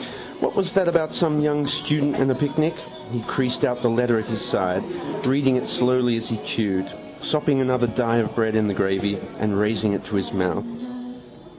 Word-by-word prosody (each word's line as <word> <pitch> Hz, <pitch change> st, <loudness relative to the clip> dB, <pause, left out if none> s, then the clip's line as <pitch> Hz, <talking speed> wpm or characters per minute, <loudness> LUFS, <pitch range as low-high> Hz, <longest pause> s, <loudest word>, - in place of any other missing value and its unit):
What -, -, -1 dB
was 190 Hz, -2 st, +1 dB
that 190 Hz, -2 st, +3 dB
about 170 Hz, -2 st, +2 dB
some 155 Hz, -3 st, +2 dB
young 150 Hz, -1 st, +1 dB
student 145 Hz, 0 st, +1 dB
and 135 Hz, 0 st, +2 dB
a -, -, +4 dB
picnic? 155 Hz, +4 st, 0 dB, 0.4 s
He 120 Hz, -1 st, -2 dB
creased 125 Hz, -2 st, -1 dB
out 125 Hz, 0 st, +1 dB
the 120 Hz, -, +4 dB
letter 120 Hz, 0 st, +2 dB
at 110 Hz, -, -2 dB
his 110 Hz, -3 st, -4 dB
side, 95 Hz, 0 st, 0 dB, 0.5 s
reading 135 Hz, -1 st, +3 dB
it 125 Hz, -, -3 dB
slowly 125 Hz, -1 st, +2 dB
as 115 Hz, -, -4 dB
he 115 Hz, -2 st, -2 dB
chewed, 95 Hz, -3 st, -1 dB, 0.3 s
sopping 150 Hz, -3 st, +1 dB
another 125 Hz, -1 st, +2 dB
die 115 Hz, 0 st, +1 dB
of 115 Hz, -2 st, 0 dB
bread 110 Hz, -1 st, +1 dB
in 110 Hz, -1 st, +3 dB
the 100 Hz, -, 0 dB
gravy 95 Hz, +1 st, 0 dB, 0.2 s
and 105 Hz, -2 st, 0 dB
raising 105 Hz, 0 st, +1 dB
it 100 Hz, -, -3 dB
to 105 Hz, -, -4 dB
his 95 Hz, -2 st, -1 dB
mouth. 95 Hz, -, 0 dB
120 Hz, 195 wpm, -23 LUFS, 105-140 Hz, 0.5 s, a